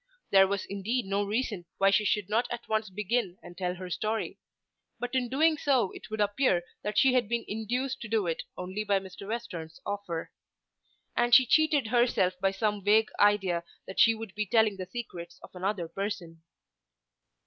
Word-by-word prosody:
There 195 -1 +7
was 200 0 -2
indeed 210 +5 -2
no 200 +1 0
reason 205 -3 -2
why 195 0 +4
she 210 +2 +3
should 205 -1 +1
not 225 +4 +1
at 240 -1 -6
once 220 -1 0
begin 205 -1 -1
and 175 - -11
tell 180 0 -2
her 180 0 -8
story. 215 +4 -2 0.6
But 245 +1 -4
in 250 -2 0
doing 310 +4 +3
so 260 -10 +2
it - - -11
would 220 0 -4
appear 205 -3 +2 0.2
that 210 - -3
she 265 -1 +5
had 245 -4 +2
been 235 0 -1
induced 245 +5 -2
to 230 - -5
do 215 -2 +1
it 165 -2 -1 0.2
only 185 +4 -4
by 200 -2 +2
Mr. 190 +1 -10
Western's 180 -8 -5
offer. 200 -5 -4 0.8
And 240 0 +5
she 260 - +8
cheated 305 +1 +3
herself 235 -6 +3
by 195 - +3
some 205 0 -1
vague 215 +2 +4
idea 195 -4 +3 0.2
that 190 - -6
she 230 0 +6
would 220 -3 -8
be 210 0 -2
telling 220 -1 +3
the 185 -1 -5
secrets 175 -7 -7
of - - -12
another 185 -1 -2
person. 175 -3 -5
210 Hz, 185 wpm, -29 LUFS, 190-235 Hz, 0.8 s, she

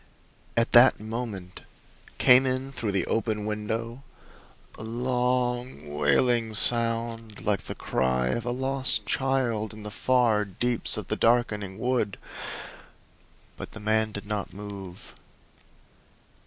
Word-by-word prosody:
At 115 +1 +2
that 125 +2 +7
moment 110 -4 -6 0.6
came 130 +1 +6
in 130 +1 -2
through 115 -6 -3
the 95 -3 0
open 110 -2 -1
window 110 +3 -4 0.7
a - - -9
long, 125 - -1
wailing 110 - +2
sound 115 -1 +2
like 100 -2 0
the - - -6
cry 65 -1 0
of 120 - -1
a 120 - -3
lost 130 +1 +1
child 120 -6 -1
in 110 - -11
the 105 - -7
far 120 -1 +2
deeps 115 +5 -1
of - - -5
the - - 0
darkening 105 -5 +1
wood! 125 -3 -1 1.4
But - - -8
the - - -8
man 110 +1 +1
did 100 -1 -7
not 105 -1 -3
move. 100 -3 -9
115 Hz, 125 wpm, -26 LUFS, 105-125 Hz, 1.4 s, that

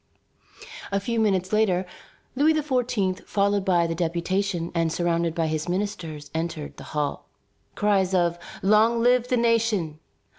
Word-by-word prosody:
A 200 - +1
few 230 +3 -2
minutes 190 -3 +1
later, 190 -4 +2 0.5
Louis 305 +4 +4
XVI., 250 -10 0
followed 200 0 +1
by 175 -3 +3
the 165 - -1
deputation 175 +1 -1
and 165 -2 +1
surrounded 170 -1 0
by 165 - +1
his 155 +1 -2
ministers, 175 -7 -4
entered 160 -2 -4
the - - -9
hall. 145 -1 -2 0.5
Cries 195 -2 +2
of 175 -1 +1 0.2
"Long 215 +4 +4
live 245 0 +3
the 250 - +1
nation! 225 -9 +1
190 Hz, 140 wpm, -25 LUFS, 170-215 Hz, 0.5 s, Louis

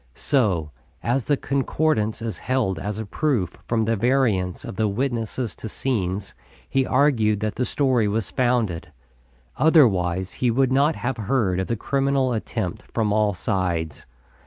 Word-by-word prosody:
So, 95 - +1 0.3
as 120 +2 0
the 145 - +2
Concordance 135 -5 0
is 110 -5 -4
held 120 -9 0
as 105 +4 -4
a 110 - -4
proof 115 - -1
from 115 -2 +1
the 115 +1 +1
variance 110 -6 +1
of - - -7
the 110 +2 +1
witnesses 120 +1 -2
to 110 - -7
scenes, 100 -6 -2 0.3
he 135 -1 +1
argued 120 -7 +3
that 110 -1 -1
the 125 - -1
story 130 -7 +1
was 105 -2 -2
founded. 115 - 0 0.7
Otherwise 95 - +3
he 125 - 0
would 130 +2 +2
not 145 +4 +3
have 125 0 -3
heard 105 -4 0
of 95 - -2
the 115 - 0
criminal 135 +2 +1
attempt 110 - -3
from 105 -3 0
all 105 -2 +2
sides. 85 -6 -2
115 Hz, 155 wpm, -23 LUFS, 100-130 Hz, 0.7 s, argued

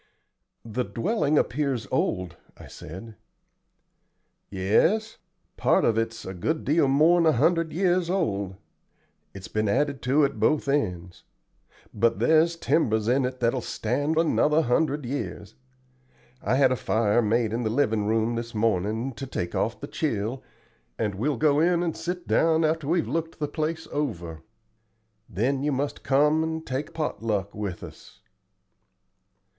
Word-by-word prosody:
"The 115 +3 -2
dwelling 150 - 0
appears 135 -5 0
old," 90 -2 -1 0.2
I - - -12
said. 100 +7 -10 1.3
"Yes; 160 - +1 0.4
part - - +3
of 115 - +2
it's 115 0 -2
a 95 - -5
good 155 - -2
deal 150 0 +3
more'n 160 +5 +4
a 155 - +5
hundred 165 +5 +2
years 180 0 +1
old. 100 - -1 0.8
It's 95 -2 -8
been 110 -1 -1
added 140 +3 0
to 140 +4 +3
at 140 0 -4
both 155 -2 +2
ends. 90 -11 -2 0.7
But 115 +2 +2
there's 160 +2 +3
timbers 110 -10 +1
in 130 +2 +2
it 125 0 -5
that 115 0 +2
will 130 - -2
stand 145 +9 -2
another 160 -1 +3
hundred 145 +2 0
years. 140 +4 -5 0.9
I 120 - +1
had 135 -1 +4
a - - +2
fire 110 -1 +1
made 110 0 +1
in 120 - -1
the 110 - -1
livin' 110 -4 +1
room 110 +1 +1
this 115 0 -5
mornin', 110 +3 0
to 135 +2 -7
take 85 -8 -4
off 115 - -1
the 140 - -5
chill, 125 -5 -2 0.6
and 105 -3 -1
we'll 125 +8 -1
go 145 +2 +3
in 175 +1 +2
and 165 -2 -2
sit 180 0 -5
down 160 0 +3
after 155 -2 -1
we've 170 +1 +1
looked 165 +5 -3
the 150 - -2
place 160 +2 -3
over. 85 - -3 0.9
Then 125 +7 0
you 145 +1 0
must 140 +2 -2
come 150 +3 +3
and 160 0 -4
take 135 +3 -4
pot 155 -7 -3
luck 100 -3 -2
with 100 -4 -5
us." - - -13
135 Hz, 150 wpm, -26 LUFS, 110-155 Hz, 1.3 s, a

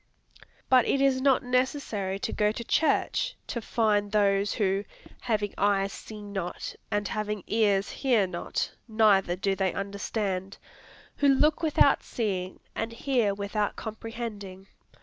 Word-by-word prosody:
But 255 -2 +5
it 275 - +2
is 270 -1 +3
not 270 -1 +3
necessary 250 -6 -1
to - - -2
go 210 0 +2
to 235 - -5
church, 325 - +1
to 235 - -4
find 210 -3 +1
those 200 -1 +2
who 195 -1 0 0.4
"having 210 -4 -1
eyes 200 -1 +2
see 215 -1 -9
not, 195 -4 -5 0.2
and 205 0 0
having 210 -2 -3
ears 205 -3 +2
hear 245 -7 +2
not, 175 -2 -3 0.2
neither 210 -5 +3
do 195 +1 0
they 190 -2 0
understand," 200 -1 -3 0.6
who 285 - +3
look 295 +4 +4
without 300 -3 +4
seeing, 190 -5 -3
and 225 +1 -3
hear 230 -5 +1
without 205 +1 -2
comprehending. 220 -4 -7
210 Hz, 135 wpm, -28 LUFS, 195-235 Hz, 0.6 s, But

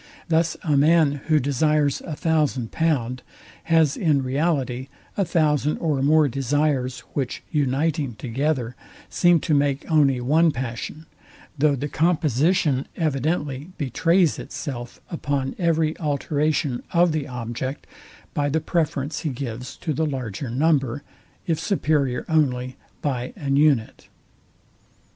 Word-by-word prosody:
Thus 165 0 +2
a 150 -3 +1
man, 145 -1 +4
who 155 -2 +4
desires 145 +1 +1
a 155 - -6
thousand 150 -8 0
pound, 130 -6 0 0.4
has 160 -3 +3
in 150 -6 +2
reality 130 -2 -1 0.3
a 200 - +2
thousand 150 -4 +1
or 150 -5 0
more 150 +2 +4
desires 135 -1 0
which 135 -4 -3
uniting 145 -2 0
together, 125 0 -2 0.4
seem 175 -1 +4
to 155 - 0
make 140 -1 +1
only 140 -5 +4
one 155 +7 +3
passion; 130 +4 -5 0.5
though 145 0 +3
the 140 +2 -3
composition 155 -2 +1
evidently 150 0 -2
betrays 165 - +2
itself 120 -5 -6
upon 140 -5 -2
every 160 -2 +1
alteration 145 -2 0
of 170 0 +4
the 155 -2 -2
object, 125 +2 -5 0.5
by 145 0 0
the 160 +3 +1
preference 155 -2 -1
he 160 - -2
gives 125 -2 -6
to 160 - -3
the 160 +3 0
larger 130 -3 -4
number, 135 0 +1 0.4
if 165 -4 0
superior 150 -8 0
only 130 -5 +1 0.3
by 125 -3 -2
an 140 -2 -1
unite. 140 -6 +2
145 Hz, 125 wpm, -23 LUFS, 130-160 Hz, 0.5 s, man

